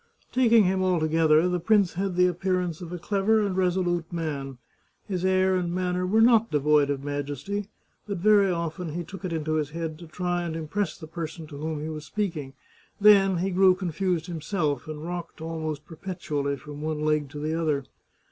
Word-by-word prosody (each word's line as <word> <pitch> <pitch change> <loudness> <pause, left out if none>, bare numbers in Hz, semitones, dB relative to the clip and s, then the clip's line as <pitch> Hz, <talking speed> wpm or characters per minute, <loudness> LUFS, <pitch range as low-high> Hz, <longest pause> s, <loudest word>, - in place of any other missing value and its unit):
Taking 235 -3 +5
him 190 0 +1
altogether, 160 -2 +3
the 180 0 0
prince 200 0 +3
had 190 0 -2
the 180 0 +5
appearance 180 -1 -1
of 175 -1 -7
a 180 - -4
clever 200 +5 +2
and 195 -2 -2
resolute 175 -2 0
man. 145 -6 -4 0.5
His 185 -3 -2
air 185 0 +3
and 175 -2 -1
manner 180 0 -1
were 220 +4 +3
not 230 -1 +5
devoid 150 -1 +3
of 140 -1 -2
majesty, 145 +8 -3 0.4
but 200 -2 -3
very 200 +1 +5
often 170 -1 -3
he 175 +1 -3
took 195 +2 -10
it 185 - -3
into 155 -1 -1
his 150 -2 -1
head 160 0 -5
to 170 - -10
try 175 +2 -2
and 170 -2 -3
impress 165 +6 -2
the 160 - -9
person 160 0 -6
to 145 -2 -10
whom 155 0 -3
he 155 - -4
was 155 -1 -6
speaking; 165 -9 -3 0.5
then 195 -3 +6
he 190 +3 -1
grew 185 0 +5
confused 180 -2 -1
himself, 160 -5 -2
and 155 -1 -6
rocked 175 -1 -6
almost 160 -2 -4
perpetually 155 -5 -3
from 150 0 -9
one 155 -1 -2
leg 150 -2 +1
to 150 - -9
the 155 +2 -2
other. 155 -4 0
170 Hz, 190 wpm, -26 LUFS, 155-185 Hz, 0.5 s, then